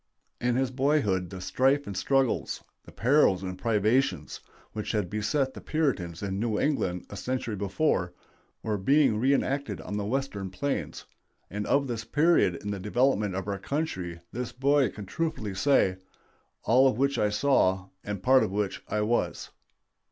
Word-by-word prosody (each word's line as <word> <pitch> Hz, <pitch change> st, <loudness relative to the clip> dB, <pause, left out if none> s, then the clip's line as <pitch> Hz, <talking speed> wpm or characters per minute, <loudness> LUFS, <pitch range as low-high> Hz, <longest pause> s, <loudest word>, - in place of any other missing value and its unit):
In 120 Hz, 0 st, +1 dB
his 130 Hz, 0 st, 0 dB
boyhood 125 Hz, -, +1 dB
the 95 Hz, -, -7 dB
strife 130 Hz, +10 st, +1 dB
and 100 Hz, -, -6 dB
struggles, 135 Hz, +5 st, 0 dB, 0.2 s
the -, -, -13 dB
perils 120 Hz, -7 st, +3 dB
and 90 Hz, -1 st, -4 dB
privations, 110 Hz, +6 st, 0 dB, 0.3 s
which 105 Hz, +1 st, -4 dB
had 105 Hz, -5 st, -1 dB
beset 130 Hz, +6 st, 0 dB
the -, -, -9 dB
Puritans 105 Hz, -, -1 dB
in 95 Hz, -1 st, -2 dB
New 110 Hz, -1 st, 0 dB
England 95 Hz, -, 0 dB
a -, -, -6 dB
century 125 Hz, 0 st, -3 dB
before, 100 Hz, -, 0 dB, 0.5 s
were 105 Hz, -2 st, -1 dB
being 135 Hz, 0 st, +3 dB
reënacted 140 Hz, +1 st, +1 dB
on 105 Hz, -, -3 dB
the 105 Hz, -, -2 dB
Western 110 Hz, -5 st, -2 dB
plains; 140 Hz, +10 st, -3 dB, 0.5 s
and 105 Hz, +2 st, -3 dB
of 140 Hz, 0 st, +3 dB
this 115 Hz, -3 st, -4 dB
period 145 Hz, -, +3 dB
in 105 Hz, -, -3 dB
the 100 Hz, -, -4 dB
development 105 Hz, -1 st, +1 dB
of 95 Hz, +1 st, -4 dB
our 100 Hz, -1 st, -2 dB
country 95 Hz, -, -3 dB
this 125 Hz, 0 st, -4 dB
boy 140 Hz, -1 st, +2 dB
can 100 Hz, +1 st, -9 dB
truthfully 110 Hz, -, -3 dB
say, 95 Hz, -4 st, +3 dB, 0.7 s
"All 130 Hz, +4 st, +5 dB
of 130 Hz, -, +1 dB
which 140 Hz, +2 st, +1 dB
I 105 Hz, -, +2 dB
saw, 100 Hz, -6 st, +2 dB
and 100 Hz, -2 st, -5 dB
part 130 Hz, 0 st, +6 dB
of -, -, 0 dB
which 100 Hz, 0 st, -2 dB
I 105 Hz, -, -1 dB
was." 115 Hz, +3 st, -1 dB
110 Hz, 165 wpm, -28 LUFS, 100-135 Hz, 0.7 s, part